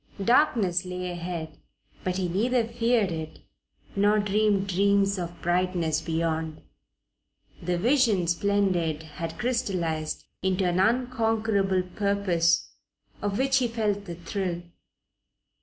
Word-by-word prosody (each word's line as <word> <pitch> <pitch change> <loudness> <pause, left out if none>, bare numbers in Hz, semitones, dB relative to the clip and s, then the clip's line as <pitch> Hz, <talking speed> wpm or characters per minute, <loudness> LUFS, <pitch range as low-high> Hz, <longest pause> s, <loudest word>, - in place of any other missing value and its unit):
Darkness 220 - +3
lay 180 0 -4
ahead, 170 -3 -5 0.4
but 185 0 -1
he 185 -2 0
neither 230 +7 +1
feared 230 -4 +1
it 160 -1 -5 0.6
nor 205 +1 +4
dreamed 205 -1 +2
dreams 200 +1 +2
of 175 0 -6
brightness 175 -3 +1
beyond. 160 -1 -2 1.0
The 175 +1 -1
Vision 230 -3 +3
Splendid 175 -3 +1
had 165 +1 -6
crystallized 180 -11 -1 0.2
into 190 0 +1
an 175 +1 +1
unconquerable 225 -4 +1
purpose 185 -3 +1 0.5
of 205 -1 -1
which 270 +1 +3
he 255 -2 +2
felt 210 -3 -1
the 170 -3 -6
thrill. 175 0 -3
190 Hz, 110 wpm, -27 LUFS, 175-210 Hz, 1.0 s, nor